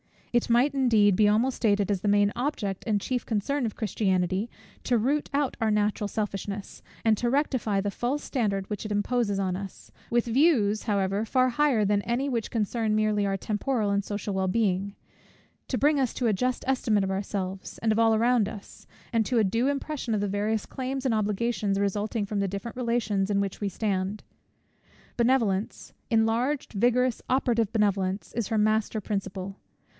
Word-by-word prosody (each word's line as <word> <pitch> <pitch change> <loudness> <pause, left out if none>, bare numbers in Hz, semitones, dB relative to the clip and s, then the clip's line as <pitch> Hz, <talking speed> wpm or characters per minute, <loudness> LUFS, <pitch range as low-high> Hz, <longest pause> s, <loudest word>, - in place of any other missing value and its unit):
It 240 0 +2
might 245 +5 +3
indeed, 220 -8 +4
be 210 - +5
almost 230 +5 +2
stated 205 -2 +2
as 195 -3 -1
the 210 - -2
main 205 0 +4
object 240 -8 -2
and 210 -2 +1
chief 250 +2 -2
concern 245 +5 -1
of 215 - -6
Christianity, 190 -1 0 0.4
to 245 - +3
root 275 +7 0
out 280 -1 0
our 225 - +2
natural 210 0 +1
selfishness, 205 -1 -4 0.2
and 220 -2 +3
to 240 - 0
rectify 250 -7 +1
the 205 +1 -2
false 255 +8 -2
standard 200 -7 -1
which 210 - -4
it 210 - -2
imposes 205 0 0
on 185 -2 0
us; 195 0 -8 0.2
with 240 0 +2
views, 235 -5 +3
however, 200 -1 0
far 255 +3 +2
higher 255 -3 +2
than 205 0 +2
any 250 +4 -1
which 235 -4 -2
concern 220 0 0
merely 215 -1 +1
our 195 - 0
temporal 210 +2 -1
and 200 0 0
social 205 0 -4
well 190 0 0
being; 200 -1 0 0.7
to 255 - -1
bring 290 +4 +3
us 260 -3 0
to 245 - 0
a 215 - +3
just 250 +5 -1
estimate 230 -6 +1
of 195 - -1
ourselves, 190 -1 -4
and 225 - +1
of 215 - +1
all 225 -1 +4
around 235 -1 +3
us, 210 -3 -11 0.2
and 230 -2 +2
to 250 - 0
a 225 - +4
due 230 +6 +1
impression 280 -4 -2
of 205 - -1
the 205 - -1
various 210 +2 -1
claims 265 +1 -4
and 255 - +2
obligations 210 -1 0
resulting 205 +2 -1
from 205 0 -3
the 200 - +1
different 200 +6 -6
relations 230 -5 0
in 200 -1 +2
which 195 -1 -3
we 205 - 0
stand. 195 0 -2 0.9
Benevolence, 230 -5 0 0.2
enlarged, 230 +5 +1
vigorous, 245 +3 +2
operative 235 -5 +1
benevolence, 195 -3 0
is 235 -3 -2
her 225 - -1
master 215 0 +1
principle. 195 -1 -4
215 Hz, 180 wpm, -27 LUFS, 200-240 Hz, 0.9 s, be